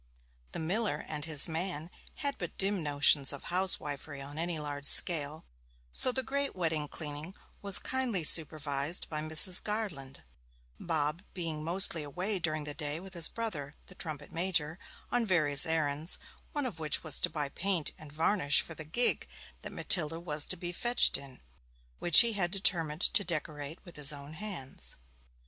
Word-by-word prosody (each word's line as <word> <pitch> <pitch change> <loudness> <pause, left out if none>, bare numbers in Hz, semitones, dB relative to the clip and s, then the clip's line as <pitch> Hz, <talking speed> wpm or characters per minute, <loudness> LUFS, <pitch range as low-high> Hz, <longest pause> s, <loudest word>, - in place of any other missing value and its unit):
The - - -5
miller 175 0 -2
and 150 -1 -5
his 155 -3 +6
man 165 0 -3 0.2
had 280 -1 -2
but 175 - -7
dim 195 -1 0
notions 145 -2 +2
of 140 - -9
housewifery 150 -6 -2
on 145 +3 -10
any 170 0 -2
large 145 -1 -6
scale; 155 -1 +5 0.5
so 255 - +6
the 260 +1 -3
great 280 +3 -4
wedding 160 -4 -2
cleaning 150 +4 -6 0.3
was 200 -1 +5
kindly 255 -9 -2
supervised 155 0 +2
by 150 -1 -3
Mrs. 160 +4 +5
Garland, 185 -12 -6 0.6
Bob 160 0 -3
being 165 -4 -5
mostly 170 0 +3
away 180 +7 -4
during 155 -3 -2
the 150 0 -4
day 150 0 -4
with 190 +1 -12
his 170 -2 +5
brother, 155 -12 -6
the - - -13
trumpet 155 -5 -8
major, 165 -1 -2 0.3
on 245 -1 0
various 155 -9 +4
errands, 155 0 +1 0.3
one 290 -3 -4
of 210 -10 -7
which 155 -1 -1
was 160 -3 +5
to - - +2
buy 145 -3 -4
paint 180 -1 -2
and 150 -1 -14
varnish 155 -1 +1
for 160 - -8
the 160 - -8
gig 240 +11 0 0.3
that - - -8
Matilda 165 -2 -2
was 155 -3 0
to 185 - -1
be 175 +1 -6
fetched 240 +7 +1
in, 135 -2 -6 0.6
which 170 - +7
he 235 -1 0
had 190 -4 -1
determined 175 -5 +1
to 205 - +3
decorate 155 -3 -6
with 175 -3 -14
his 150 0 +7
own 145 +1 -10
hands. 135 - -4
160 Hz, 165 wpm, -30 LUFS, 150-185 Hz, 0.6 s, which